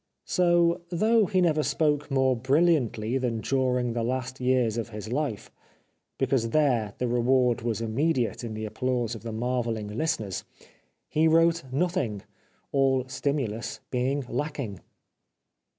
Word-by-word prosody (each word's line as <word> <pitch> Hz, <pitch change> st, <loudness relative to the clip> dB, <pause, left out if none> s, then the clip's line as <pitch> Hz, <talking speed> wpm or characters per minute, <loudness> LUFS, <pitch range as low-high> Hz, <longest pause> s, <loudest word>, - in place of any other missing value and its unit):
So 175 Hz, -1 st, +3 dB
though 215 Hz, +4 st, +3 dB
he 185 Hz, 0 st, +2 dB
never 155 Hz, -3 st, +3 dB
spoke 150 Hz, -2 st, 0 dB
more 130 Hz, -2 st, +2 dB
brilhantly 130 Hz, -3 st, +2 dB
than 120 Hz, -3 st, -1 dB
during 125 Hz, -2 st, 0 dB
the 120 Hz, -, -1 dB
last 130 Hz, +2 st, -3 dB
years 125 Hz, -3 st, +2 dB
of 115 Hz, -1 st, -3 dB
his 105 Hz, 0 st, -7 dB
life, 140 Hz, -7 st, -2 dB, 0.7 s
because 130 Hz, -3 st, +1 dB
there 120 Hz, -7 st, +1 dB
the 125 Hz, -, -1 dB
reward 125 Hz, 0 st, +2 dB
was 115 Hz, -1 st, -2 dB
immediate 125 Hz, +2 st, 0 dB
in 110 Hz, -2 st, -5 dB
the 110 Hz, 0 st, -4 dB
applause 120 Hz, +1 st, -1 dB
of 115 Hz, -, -7 dB
the 115 Hz, -, -6 dB
marvelling 115 Hz, -2 st, -2 dB
listeners, 110 Hz, -, -2 dB, 0.6 s
he 160 Hz, +1 st, +2 dB
wrote 165 Hz, 0 st, +3 dB
nothing, 135 Hz, -, -1 dB, 0.5 s
all 135 Hz, -2 st, +2 dB
stimulus 130 Hz, -4 st, -2 dB
being 130 Hz, +2 st, 0 dB
lacking. 140 Hz, -, -3 dB
130 Hz, 135 wpm, -27 LUFS, 115-150 Hz, 0.7 s, So